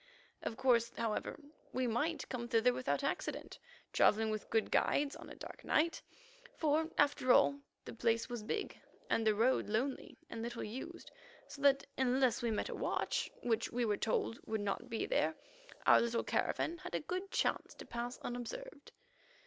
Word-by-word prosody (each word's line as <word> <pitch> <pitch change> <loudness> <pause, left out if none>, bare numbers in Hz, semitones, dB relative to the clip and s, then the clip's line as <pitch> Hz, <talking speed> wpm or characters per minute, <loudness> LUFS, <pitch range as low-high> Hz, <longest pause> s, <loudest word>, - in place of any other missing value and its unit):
Of 225 - -4
course, 235 -3 +3
however, 225 +3 -2 0.3
we 255 0 +1
might 280 +6 0
come 240 -2 -4
thither 235 +1 +4
without 255 - -1
accident, - - -3 0.3
travelling 220 +1 +4
with 215 -1 -4
good 225 -1 +1
guides 285 0 +2
on - - -10
a - - -9
dark - - -10
night, 330 +2 +2 0.6
for, 315 +1 +2
after 285 -3 +3
all, 140 - +5 0.3
the - - -7
place 230 -1 +1
was 240 -3 -4
big, 415 - -3 0.3
and 225 -1 +2
the 215 - +4
road 235 +3 +2
lonely 255 +6 -1
and 230 -8 -6
little 235 +1 -4
used, 265 +11 -7 0.4
so 280 - -10
that 275 -1 +5
unless 260 -1 +3
we 235 - 0
met 215 - -1
a - - -3
watch, - - -1
which, 230 -2 0
we 245 0 0
were 210 -2 +2
told, 225 +2 0
would 220 -1 -1
not 200 -1 -2
be 225 - -1
there, - - +1 0.5
our - - +7
little 235 0 0
caravan 340 +1 0
had 360 0 -5
a - - +1
good 370 +5 -4
chance - - 0
to - - -10
pass 240 +1 -4
unobserved. 280 - -6
245 Hz, 175 wpm, -35 LUFS, 225-280 Hz, 0.6 s, our